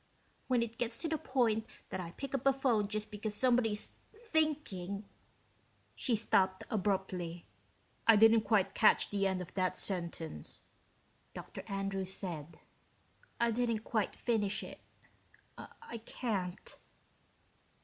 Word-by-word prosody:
When 250 -2 +3
it 230 0 -7
gets 235 -1 0
to - - +1
the 315 -1 -1
point 230 -5 +1 0.2
that 190 - -3
I 175 -2 -4
pick 275 -1 -6
up 275 0 0
a 275 - +6
phone 245 -6 +2
just 215 +1 -3
because 210 0 -3
somebody's 235 -3 +2 0.2
thinking...." 305 - -1 0.9
She 245 - 0
stopped 190 -3 +2
abruptly. 185 -4 -1 0.6
"I 225 - +9
didn't 225 +1 +7
quite 210 -3 +2
catch 220 - +5
the 200 -1 +2
end 185 -1 -1
of 175 - -13
that 185 -1 0
sentence," 170 - -4 0.7
Dr. - - -7
Andrews 195 -1 -2
said. 170 -5 -4 0.8
"I 235 0 +3
didn't 230 -2 0
quite 215 -4 0
finish 210 -4 0
it. - - -9 0.8
I 230 - -9
can't." 200 -6 -4
215 Hz, 130 wpm, -34 LUFS, 190-235 Hz, 0.9 s, I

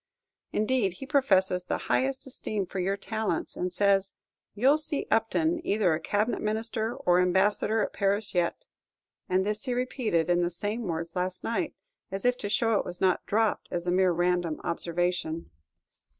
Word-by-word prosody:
Indeed, 215 -3 +1
he 225 - -8
professes 190 -11 +2
the - - -1
highest 265 0 0
esteem 215 -6 -3
for 185 +1 -5
your 195 +2 0
talents, 220 +1 -2
and 180 0 -2
says, 195 0 +2 0.4
"You'll 270 +8 +4
see 305 -1 -2
Upton 320 +10 +2
either 200 - +2
a 155 - -1
cabinet 210 +6 0
minister 220 +2 -1
or 180 -10 +2
ambassador 195 +4 +2
at - - -4
Paris 200 +1 0
yet;" 175 -2 0 0.6
and 185 +1 +2
this 210 +4 -2
he 250 -2 -1
repeated 245 - 0
in 175 0 +3
the 175 - +1
same 205 +5 -3
words 165 0 -3
last 180 0 -2
night, 230 - -2 0.3
as 195 +2 -3
if 245 0 +4
to 205 - -3
show 225 0 +2
it - - -1
was 175 0 -6
not 185 -2 +2
dropped 220 +1 +1
as 175 0 -3
a 175 - +1
mere 185 0 +4
random 175 -2 0
observation. 170 - -1
200 Hz, 170 wpm, -28 LUFS, 180-225 Hz, 0.6 s, You'll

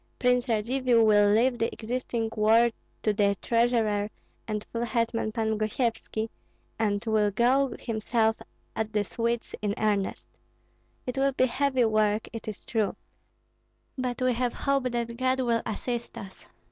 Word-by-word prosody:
Prince 250 0 +2
Radzivill 235 +1 +2
will 205 -1 +5
leave 235 +4 +3
the 230 - 0
existing 230 -1 -3
war 225 +2 +4 0.3
to 215 - +2
the 200 -1 +2
treasurer 230 -3 +1 0.4
and 210 -1 -2
full 230 0 -2
hetman 230 -2 0
Pan 220 -1 -1
Gosyevski, 220 0 -1 0.5
and 210 -1 0
will 215 -2 +2
go 250 +5 +2
himself 225 0 0 0.4
at 220 0 -2
the 210 -1 +2
Swedes 230 +3 -2
in 205 -1 -1
earnest. 205 -2 -1 0.8
It 250 +1 -3
will 275 0 +2
be 255 - +3
heavy 260 -1 +1
work, 215 -1 +1
it 225 -1 -7
is 215 - -7
true. 220 -3 0 1.0
But 255 -1 -2
we 255 -1 +3
have 245 0 -1
hope 275 -2 0
that 235 -1 -3
God 260 +1 +1
will 235 -2 +1
assist 235 +2 -4
us." 195 -1 -10
230 Hz, 145 wpm, -27 LUFS, 215-245 Hz, 1.0 s, will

